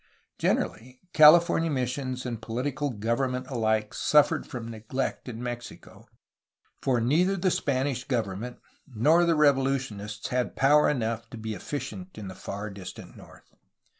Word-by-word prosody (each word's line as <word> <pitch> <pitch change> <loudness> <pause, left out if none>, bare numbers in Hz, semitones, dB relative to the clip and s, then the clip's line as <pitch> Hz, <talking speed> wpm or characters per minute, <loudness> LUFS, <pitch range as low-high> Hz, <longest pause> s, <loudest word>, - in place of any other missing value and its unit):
Generally, 125 +3 -1
California 165 +2 +6
missions 130 -1 -2
and 115 -3 -4
political 135 +6 -2
government 125 +3 -1
alike 110 -3 0
suffered 150 -1 +3
from 120 -3 -6
neglect 115 +4 -4
in 120 0 -7
Mexico, 120 -1 -8 0.7
for 125 -3 +1
neither 170 +11 +2
the 185 0 +1
Spanish 135 -3 -1
government 115 -1 -3 0.3
nor 150 +8 +3
the 170 -1 +3
revolutionists 130 -8 0
had 125 -1 -1
power 150 +3 +5
enough 115 -4 -2
to 120 - -9
be 110 0 -4
efficient 145 - -6
in 105 -3 -6
the - - -7
far 100 +3 -6
distant 95 -2 -10
north. - - -16
125 Hz, 135 wpm, -27 LUFS, 115-145 Hz, 0.7 s, California